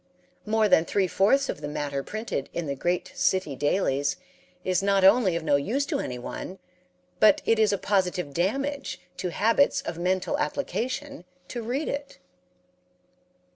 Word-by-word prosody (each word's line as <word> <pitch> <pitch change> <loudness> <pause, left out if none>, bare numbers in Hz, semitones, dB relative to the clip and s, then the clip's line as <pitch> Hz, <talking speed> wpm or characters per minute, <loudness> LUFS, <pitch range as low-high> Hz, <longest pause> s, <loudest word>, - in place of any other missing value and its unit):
More 220 0 +3
than 160 - +5
three 195 +3 +1
fourths 220 +10 +3
of - - -4
the 145 - -4
matter 145 -1 -3
printed 215 -5 -4
in 170 - -3
the 140 - -2
"great 175 +6 -2
city 185 -7 0
dailies" 145 -1 0 0.5
is 185 0 +1
not 195 -1 +2
only 195 -2 +5
of 170 - -2
no 145 -3 +3
use 235 - -1
to 285 -1 -2
anyone, 125 - -5 0.6
but 215 -2 +5
it 225 -1 +3
is 215 -1 +4
a 200 - +1
positive 180 -7 0
damage 275 - -1 0.2
to 180 - -2
habits 230 +10 +3
of 170 - -6
mental 185 +10 0
application 280 -3 -3 0.3
to 240 - -4
read 255 +7 -2
it. 280 -6 -5
195 Hz, 155 wpm, -26 LUFS, 170-245 Hz, 0.6 s, than